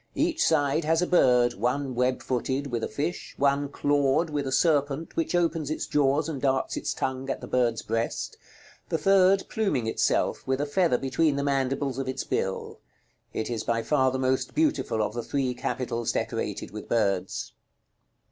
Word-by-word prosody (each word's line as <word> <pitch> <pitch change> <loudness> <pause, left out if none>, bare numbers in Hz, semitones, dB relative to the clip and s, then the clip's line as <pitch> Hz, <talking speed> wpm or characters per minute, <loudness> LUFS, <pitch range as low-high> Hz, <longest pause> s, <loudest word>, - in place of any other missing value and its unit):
Each - - +1
side 150 0 +2
has 165 +3 +2
a - - +2
bird, 125 -8 +4
one 130 +5 -1
web 125 +1 0
footed, 130 +2 -1
with 115 -2 -2
a - - 0
fish, 150 +10 -4
one 140 0 +2
clawed, 145 +3 +1
with 145 -2 -2
a - - -2
serpent, 145 +1 +1
which 165 +2 0
opens 165 -4 +1
its 155 - -2
jaws, 145 +1 +2
and 145 -5 -4
darts 135 -1 +1
its - - -2
tongue 130 +1 -3
at - - -2
the - - -8
bird's 120 -3 0
breast; 115 +1 -2 0.5
the 165 - +1
third 195 +3 +4
pluming 195 - 0
itself, 115 - +1
with 130 0 0
a 145 - 0
feather 150 -2 +2
between 140 +3 +1
the 140 - -1
mandibles 135 -1 0
of 135 - -3
its 130 - -2
bill. 95 - -3 0.5
It 110 - -3
is 115 - -2
by 115 -1 0
far 130 +1 +3
the 130 - -2
most 130 0 0
beautiful 290 - +1
of - - -2
the 120 - -3
three 130 +1 -1
capitals 125 -1 -2
decorated - - -3
with - - -8
birds. 100 -5 0
135 Hz, 180 wpm, -27 LUFS, 125-150 Hz, 0.5 s, bird